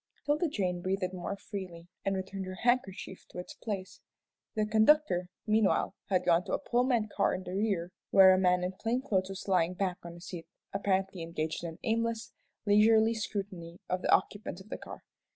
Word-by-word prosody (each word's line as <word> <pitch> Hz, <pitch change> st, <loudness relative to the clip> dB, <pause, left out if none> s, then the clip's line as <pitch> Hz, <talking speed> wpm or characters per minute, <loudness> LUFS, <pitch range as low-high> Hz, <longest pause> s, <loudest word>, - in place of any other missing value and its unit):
'Tilda 300 Hz, +4 st, +2 dB
Jane 180 Hz, -, -1 dB
breathed 185 Hz, 0 st, -1 dB
more 180 Hz, +2 st, -4 dB
freely, 185 Hz, -5 st, -7 dB, 0.2 s
and 195 Hz, 0 st, 0 dB
returned 190 Hz, 0 st, -4 dB
her 185 Hz, -, -5 dB
handkerchief 235 Hz, -6 st, 0 dB
to -, -, -11 dB
its 180 Hz, -, -6 dB
place. 195 Hz, -4 st, -5 dB, 0.5 s
The 215 Hz, -1 st, +2 dB
conductor, 220 Hz, -, +4 dB, 0.2 s
meanwhile, 215 Hz, -3 st, +2 dB, 0.2 s
had 185 Hz, -2 st, +2 dB
gone 175 Hz, 0 st, +4 dB
to -, -, -4 dB
a -, -, +3 dB
Pullman 240 Hz, -2 st, +1 dB
car -, -, +2 dB
in 185 Hz, -, -5 dB
the 180 Hz, 0 st, -6 dB
rear, 195 Hz, -4 st, 0 dB, 0.2 s
where 190 Hz, -1 st, +8 dB
a 185 Hz, -, +3 dB
man 180 Hz, -1 st, +3 dB
in 180 Hz, -, -1 dB
plain 230 Hz, +7 st, -2 dB
clothes 190 Hz, -7 st, 0 dB
was 195 Hz, +1 st, -7 dB
lying 180 Hz, -2 st, +2 dB
back 185 Hz, -2 st, -1 dB
on 170 Hz, 0 st, -8 dB
a -, -, -11 dB
seat, 170 Hz, -1 st, -8 dB, 0.3 s
apparently 195 Hz, -2 st, 0 dB
engaged 165 Hz, 0 st, -3 dB
in 170 Hz, -, -2 dB
an 165 Hz, -, -17 dB
aimless, 230 Hz, 0 st, -1 dB, 0.3 s
leisurely 220 Hz, +2 st, +5 dB
scrutiny 195 Hz, -6 st, -5 dB
of 185 Hz, 0 st, 0 dB
the -, -, 0 dB
occupants 205 Hz, -3 st, +1 dB
of 190 Hz, +3 st, -14 dB
the -, -, -4 dB
car. -, -, -10 dB
190 Hz, 190 wpm, -31 LUFS, 180-215 Hz, 0.5 s, where